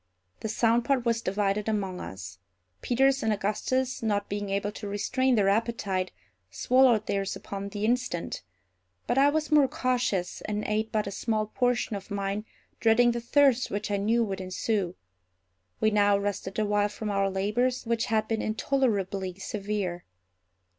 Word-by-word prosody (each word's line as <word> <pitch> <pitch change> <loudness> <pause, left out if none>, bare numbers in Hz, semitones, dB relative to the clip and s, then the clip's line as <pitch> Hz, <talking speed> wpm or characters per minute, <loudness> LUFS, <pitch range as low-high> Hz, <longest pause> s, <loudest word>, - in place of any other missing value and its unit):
The 220 - -4
sound 230 +2 +2
part 255 -1 +1
was 230 -1 +1
divided 200 +1 0
among 195 -4 -2
us. 95 +1 -8 0.4
Peters 270 +2 +2
and 220 - +1
Augustus, 215 +5 -1
not 205 -3 -1
being 205 0 -3
able 200 +1 -1
to 210 - -7
restrain 250 +6 +1
their 205 -3 +3
appetite, 200 -3 0 0.4
swallowed 245 - +3
theirs 195 -1 -1
upon 200 0 -6
the 205 +1 -3
instant; 240 -7 -1 0.6
but 250 - +1
I 280 +1 +6
was 310 +1 -1
more 295 -3 +6
cautious, 245 -9 -1
and 210 0 -2
ate 215 +1 -1
but 215 -1 0
a 200 - -4
small 215 +1 -1
portion 245 0 0
of 200 +1 -8
mine, 200 +1 -2 0.3
dreading 240 +2 +4
the 235 0 -3
thirst 260 0 +3
which 205 +1 -3
I 200 - +1
knew 225 +4 +2
would 195 -3 -3
ensue. 185 0 -1 0.8
We 215 - +3
now 205 -1 +4
rested 200 -1 -3
a 215 - +2
while 205 0 +2
from 210 +1 -4
our 195 -1 +1
labors, 215 +7 0
which 230 0 0
had 220 -1 0
been 225 -1 -1
intolerably 205 -6 0
severe. 195 -3 -3
210 Hz, 160 wpm, -28 LUFS, 200-235 Hz, 0.8 s, I